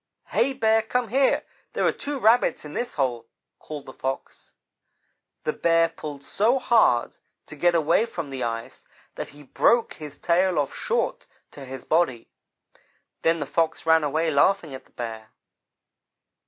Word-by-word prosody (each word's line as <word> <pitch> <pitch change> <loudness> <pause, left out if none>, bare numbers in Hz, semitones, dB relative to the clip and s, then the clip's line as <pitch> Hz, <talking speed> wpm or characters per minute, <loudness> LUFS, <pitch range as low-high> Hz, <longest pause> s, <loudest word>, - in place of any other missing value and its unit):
"'Hey, 275 - +2
Bear, 225 -3 +3
come 240 +1 -1
here 270 +4 +2 0.3
there - - 0
are - - +4
two 285 0 -5
Rabbits 230 - +3
in 150 - -8
this 245 0 -3
hole,' 120 -5 -1 0.3
called 150 -2 -8
the 130 - -10
Fox. 135 0 -5 0.9
"The 155 - -1
Bear 165 0 +3
pulled 145 -3 -8
so 225 - +2
hard 225 - +3 0.3
to - - -10
get 175 -1 +2
away 165 +8 +3
from 165 -9 -6
the 135 -1 -5
ice, 115 -1 -5 0.3
that - - -6
he 145 +1 -14
broke 230 - +2
his 150 -2 -9
tail 180 +1 +2
off 145 -2 0
short - - -2 0.2
to 140 - -10
his 130 0 -8
body. 155 -8 0 0.9
Then 165 0 +2
the 145 - -2
Fox 165 +3 -1
ran 160 -1 +5
away 160 +3 0
laughing 155 +1 +2
at 130 - -9
the - - -27
Bear. 110 -2 -7
160 Hz, 160 wpm, -25 LUFS, 140-220 Hz, 0.9 s, ran